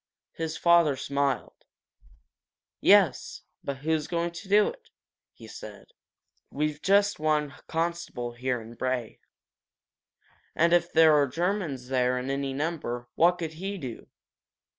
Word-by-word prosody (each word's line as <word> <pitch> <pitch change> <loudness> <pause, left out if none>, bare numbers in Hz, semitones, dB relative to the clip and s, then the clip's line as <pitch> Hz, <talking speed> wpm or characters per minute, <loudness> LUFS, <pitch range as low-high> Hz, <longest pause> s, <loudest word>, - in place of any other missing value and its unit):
His 160 0 -4
father 170 -4 +4
smiled. 140 0 -2 1.2
"Yes, - - +3 0.2
but 140 -1 -4
who's 160 -1 0
going 170 0 -1
to 170 +3 -10
do 210 +1 +5
it?" 485 -2 -13 0.4
he - - -14
said. - - -11 0.6
"We've 150 +1 -2
just 200 0 +3
one 150 -2 0
constable 165 -7 -3
here 125 +1 -2
in 115 +1 -11
Bray. 125 -1 -3 1.4
And 170 +1 +3
if 175 0 +3
there 160 -1 +6
are 145 -1 +4
Germans 160 -4 -2
there 125 -1 +1
in 130 +2 -3
any 140 0 -2
number, 135 -5 -3
what 170 +2 +4
could 160 -2 -5
he 200 +1 -3
do? 130 -9 -8
150 Hz, 130 wpm, -27 LUFS, 130-170 Hz, 1.4 s, there